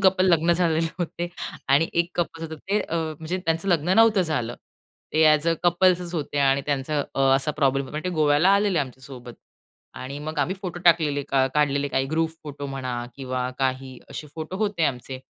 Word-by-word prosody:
Couple, 190 -1 +4
लग्न 170 +1 +4
झालेले 165 -2 +1
होते. 175 0 -3 0.4
आणि 145 +4 +4
एक 170 +1 +1
कपल 165 -1 -4
होतं, 160 -1 -5
ते 200 +7 -1
अ, 170 - -3 0.2
म्हणजे 160 +3 -3
त्यांचं 165 +3 0
लग्न 170 -2 +1
नव्हतं 225 -3 +5
झालं. 140 -9 -2 0.6
ते 155 - +3
एज 150 +2 +1
अ, 165 - +3
कपल्सच 175 0 +2
होते. 145 -2 -3
आणि 135 0 +3
त्यांचा 145 +1 -1
अ, - - -1 0.2
असा 135 +2 -1
प्रॉब्लेम 135 -1 +1
पण 150 - -3
ते - - 0
गोव्याला 150 +4 +4
आलेले 200 -3 +2
आमच्यासोबत. 130 -2 -6 0.6
आणि 140 +3 -6
मग 155 0 -5
आम्ही 145 +6 0
फोटो 175 -1 -5
टाकलेले, 155 -4 +4
का 135 -1 +1
काढलेले, 145 -1 +1
काही 135 -1 0
ग्रुप 160 0 +1
फोटो 145 -1 -6
म्हणा 135 -2 -4 0.2
किंवा 130 -1 -3
काही 130 -1 -2
असे 150 - -7
फोटो 160 +3 -5
होते 200 -6 0
आमचे. 130 0 -3
155 Hz, 185 wpm, -24 LUFS, 135-170 Hz, 0.6 s, नव्हतं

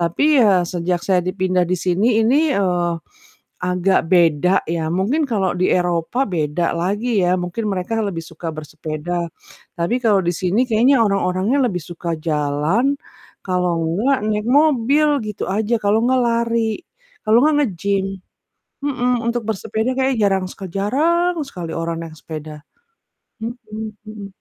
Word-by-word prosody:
Tapi 270 - +3
ya 190 -4 +4
sejak 175 0 -1
saya 185 -2 +3
dipindah 185 0 0
di 185 - +1
sini 185 +5 0 0.2
ini, 290 +7 +3
eee, 175 -3 +1 0.7
agak 180 +1 +2
beda 175 +2 +3
yah. 165 -1 -1
Mungkin 205 - +1
kalau 195 -5 0
di 185 - +3
Eropa 180 +8 0
beda 165 -1 -1
lagi 205 +5 0
ya. 180 +1 +2
Mungkin 180 +6 -4
mereka 195 +5 -2
lebih 185 -6 -3
suka 165 0 -7
bersepeda. 155 +3 -4 0.5
Tapi 170 +9 0
kalau 205 -3 +4
disini 180 +7 +1
kayaknya 240 +5 +4
orang-orangnya 195 +5 +1
lebih 180 -3 -3
suka 170 -1 -4
jalan, 155 - 0 0.5
kalau 180 -1 +1 0.3
gak 270 -2 +2
naik 210 0 0
mobil 290 +1 +3 0.2
gitu 210 - -4
aja, 215 +4 0
kalau 205 +2 +3
gak 260 0 +3
lari, 230 +3 0 0.4
kalau 220 +2 +5
gak 305 -1 +3
nge-gym, 200 -3 -1 0.8
mhm, 250 -4 0
untuk 235 0 0
bersepeda 220 +3 -1
kayaknya 265 -1 +1
jarang 190 -1 0
sekal 195 - -8
jarang 330 - +1
sekali 175 -9 -7
orang 165 0 -2
naik 160 -1 -9
sepeda. 155 0 -8 0.8
Mhm 230 +1 -2 0.5
mhm. 215 -2 -8
195 Hz, 140 wpm, -20 LUFS, 175-235 Hz, 0.8 s, kalau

